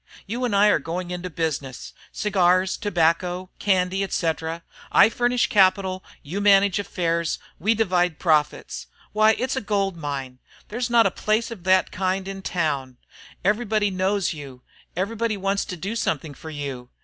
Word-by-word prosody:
You 240 +5 -2
and 225 -5 0
I 205 +1 +6
are - - +3
going 175 +4 -4
into 180 0 -4
business, 150 -6 -4 0.2
cigars, 185 -2 +2
tobacco, 180 -1 0
candy, 190 -1 +1
etc. 165 -3 -2 0.3
I - - +7
furnish 245 +1 +1
capital, 190 -1 +2 0.2
you 180 +8 -4
manage 200 -1 +5
affairs, 170 -4 -1 0.2
we 220 +7 +2
divide 180 -6 +1
profits. 155 -4 0 0.3
Why, 215 +1 +5
it's 260 +1 -1
a 265 - -1
gold 200 -3 0
mine! 140 -5 -5 0.3
There's 240 +3 -2
not 235 -1 +5
a - - +2
place 215 +2 0
of 190 -6 -9
that 185 0 +3
kind 190 0 -1
in 195 0 -6
town. 145 -9 -2 0.5
Everybody 210 0 +1
knows 190 0 0
you, 135 -4 -10 0.3
everybody 215 +4 -1
wants 195 +1 0
to 180 - -6
do 195 +7 -4
something 155 -8 -2
for 160 +3 -10
you. 140 -5 -6
185 Hz, 155 wpm, -24 LUFS, 165-205 Hz, 0.5 s, I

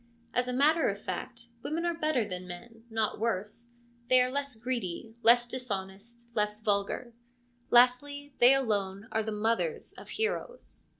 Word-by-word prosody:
As 250 0 +1
a - - -1
matter 300 +5 +3
of 200 0 -3
fact, 235 +2 -6
women 330 +6 -2
are 345 - +1
better 310 -9 0
than 180 -1 -5
men, 225 +6 -11
not 220 -2 -1
worse; 225 +2 -2 0.4
they 255 - +7
are 250 0 +3
less 280 -2 -2
greedy, 225 -3 -4
less 240 +1 +6
dishonest, 235 -1 -6
less 210 -1 0
vulgar; 210 +3 -1 0.6
lastly, 285 +4 +3
they 250 +3 +8
alone 205 -5 -1
are 220 - +1
the 220 0 -3
mothers 230 - -1
of - - -12
heroes. - - -4
235 Hz, 155 wpm, -30 LUFS, 210-260 Hz, 0.6 s, they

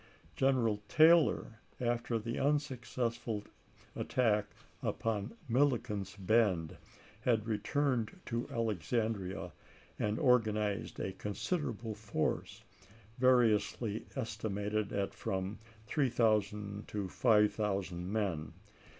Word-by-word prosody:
General 120 -5 +2
Taylor, 160 -8 +5 0.2
after 120 -1 0
the 115 +2 -3
unsuccessful 125 -6 -1 0.5
attack 105 -4 +1 0.3
upon 110 - -2
Milliken's 115 -6 +1
Bend, 100 -5 +2 0.4
had 115 -3 +1
returned 125 - 0
to 115 0 -3
Alexandria 110 -2 -1 0.5
and 105 +1 0
organized 110 -6 +2
a 95 - -2
considerable 115 - -3
force, 105 -6 -2 0.6
variously 115 -3 +3
estimated 105 -4 -2
at 100 -1 -1
from 95 +2 -3 0.3
3000 105 -6 +1
to 100 -2 -3
5000 100 -4 +1
men. 95 -8 -1
110 Hz, 80 wpm, -34 LUFS, 100-120 Hz, 0.6 s, Taylor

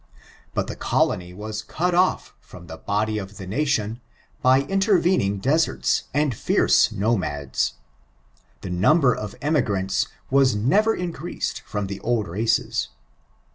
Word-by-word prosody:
But - - 0
the - - -6
colony 90 0 0
was 105 +3 -6
cut 175 +11 -2
off 180 +1 +1
from 90 -1 -14
the 80 -1 -9
body 105 +4 -1
of 100 +1 -9
the 95 - -7
nation 115 0 -1 0.4
by 130 +1 +5
intervening 185 - +2
deserts 150 +10 +1
and 145 -2 +1
fierce - - +3
nomads. 90 - -1 0.9
The 95 - -6
number 125 - +4
of 105 -2 -6
emigrants 105 -11 +1 0.2
was 135 -3 +4
never 200 - +2
increased 175 -1 -4
from 105 -1 -3
the 100 0 -6
old 115 -1 0
races. 110 +6 0
110 Hz, 130 wpm, -23 LUFS, 100-150 Hz, 0.9 s, by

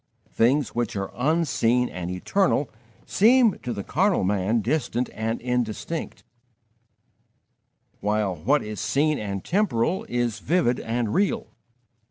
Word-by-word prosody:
Things 130 +4 +2
which 120 -3 -2
are 95 -1 -3
unseen 125 -4 +1
and 90 -4 -6
eternal 140 - 0 0.3
seem, 230 +1 +4
to 125 - -5
the 100 -3 -4
carnal 190 - +1
man, 100 +4 +1
distant 125 -1 -1
and 115 +1 -2
indistinct, 125 +6 -3 1.8
while 105 -2 0
what 135 - +1
is 105 -1 -6
seen 150 +2 +1
and 100 -2 -4
temporal 180 - 0
is 120 -2 -1
vivid 160 -8 +1
and 115 -1 -2
real. 220 +3 0
120 Hz, 120 wpm, -24 LUFS, 105-155 Hz, 1.8 s, seem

